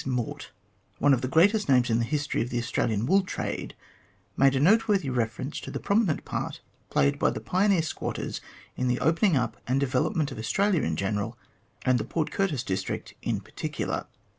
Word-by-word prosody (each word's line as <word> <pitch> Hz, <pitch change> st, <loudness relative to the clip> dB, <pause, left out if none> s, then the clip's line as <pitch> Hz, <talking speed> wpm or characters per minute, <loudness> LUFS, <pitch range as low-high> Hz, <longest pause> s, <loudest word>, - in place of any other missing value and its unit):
Mort, 125 Hz, -3 st, -3 dB, 0.5 s
one 145 Hz, -, +4 dB
of 125 Hz, -, +1 dB
the 130 Hz, -, -1 dB
greatest 200 Hz, -, +3 dB
names 125 Hz, -3 st, +4 dB
in 115 Hz, -, +3 dB
the 115 Hz, -, +1 dB
history 145 Hz, +2 st, -1 dB
of 120 Hz, -, -2 dB
the 120 Hz, -, -2 dB
Australian 115 Hz, -2 st, 0 dB
wool 195 Hz, +8 st, +4 dB
trade, 190 Hz, -, -4 dB, 0.6 s
made 135 Hz, 0 st, +4 dB
a -, -, +2 dB
noteworthy 195 Hz, -2 st, +3 dB
reference 120 Hz, +4 st, -2 dB
to -, -, -8 dB
the -, -, -4 dB
prominent 200 Hz, -6 st, +1 dB
part -, -, -4 dB, 0.3 s
played 70 Hz, 0 st, +2 dB
by -, -, +3 dB
the -, -, -3 dB
pioneer 190 Hz, -2 st, +2 dB
squatters 155 Hz, -, -4 dB, 0.3 s
in 125 Hz, -, -1 dB
the 125 Hz, 0 st, +1 dB
opening 165 Hz, +2 st, +3 dB
up 120 Hz, -2 st, -1 dB
and 130 Hz, +2 st, +2 dB
development 140 Hz, +3 st, 0 dB
of -, -, -7 dB
Australia 195 Hz, -, +1 dB
in 80 Hz, -, -1 dB
general, 105 Hz, +6 st, -2 dB, 0.5 s
and 130 Hz, -1 st, +3 dB
the -, -, -1 dB
Port 160 Hz, -2 st, -2 dB
Curtis 160 Hz, -11 st, 0 dB
district 95 Hz, 0 st, -3 dB
in -, -, -1 dB
particular. -, -, -4 dB
135 Hz, 185 wpm, -27 LUFS, 120-170 Hz, 0.6 s, one